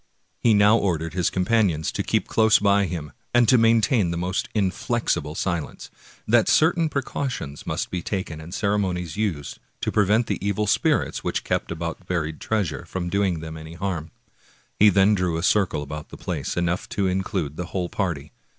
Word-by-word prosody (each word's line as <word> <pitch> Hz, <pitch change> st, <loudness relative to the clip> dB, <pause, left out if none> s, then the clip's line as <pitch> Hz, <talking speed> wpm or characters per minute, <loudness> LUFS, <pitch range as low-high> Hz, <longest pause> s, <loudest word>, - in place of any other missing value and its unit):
He 115 Hz, -3 st, +4 dB
now 105 Hz, +2 st, +6 dB
ordered 80 Hz, -4 st, -1 dB
his 90 Hz, -2 st, +1 dB
companions 95 Hz, -5 st, +1 dB
to -, -, -2 dB
keep -, -, 0 dB
close 110 Hz, -1 st, +4 dB
by 100 Hz, 0 st, +3 dB
him, 80 Hz, -5 st, -5 dB, 0.2 s
and 120 Hz, -1 st, +5 dB
to 130 Hz, -, +6 dB
maintain 115 Hz, -, +3 dB
the 85 Hz, -, -2 dB
most 90 Hz, +2 st, -2 dB
inflexible 100 Hz, -4 st, -1 dB
silence; 85 Hz, -4 st, -3 dB, 0.4 s
that 115 Hz, 0 st, +4 dB
certain 160 Hz, +1 st, +3 dB
precau 140 Hz, -1 st, -2 dB
tions 70 Hz, -, -7 dB
must -, -, -2 dB
be 90 Hz, -, -2 dB
taken 85 Hz, -5 st, -4 dB
and 80 Hz, +2 st, -10 dB
ceremonies 95 Hz, -5 st, -1 dB
used 95 Hz, -10 st, -3 dB, 0.2 s
to -, -, -1 dB
prevent 105 Hz, +3 st, +3 dB
the -, -, -3 dB
evil 100 Hz, +1 st, 0 dB
spirits 105 Hz, -, +1 dB
which -, -, -2 dB
kept -, -, -2 dB
about 85 Hz, +2 st, -5 dB
buried 80 Hz, -4 st, -2 dB
treasure 100 Hz, -8 st, -1 dB
from 90 Hz, +1 st, -4 dB
doing 95 Hz, -5 st, +1 dB
them 80 Hz, 0 st, -7 dB
any 80 Hz, +1 st, -9 dB
harm. 85 Hz, -3 st, -3 dB, 0.7 s
He 105 Hz, -, +8 dB
then 100 Hz, +1 st, +4 dB
drew 90 Hz, -4 st, 0 dB
a 85 Hz, -, -3 dB
circle 95 Hz, -7 st, +2 dB
about 75 Hz, +1 st, -7 dB
the -, -, -10 dB
place, -, -, -4 dB
enough 85 Hz, +1 st, -1 dB
to 100 Hz, -, +2 dB
include 95 Hz, -5 st, -1 dB
the 90 Hz, -, -4 dB
whole 90 Hz, -1 st, -2 dB
party. 80 Hz, -6 st, -3 dB
95 Hz, 180 wpm, -24 LUFS, 85-105 Hz, 0.7 s, He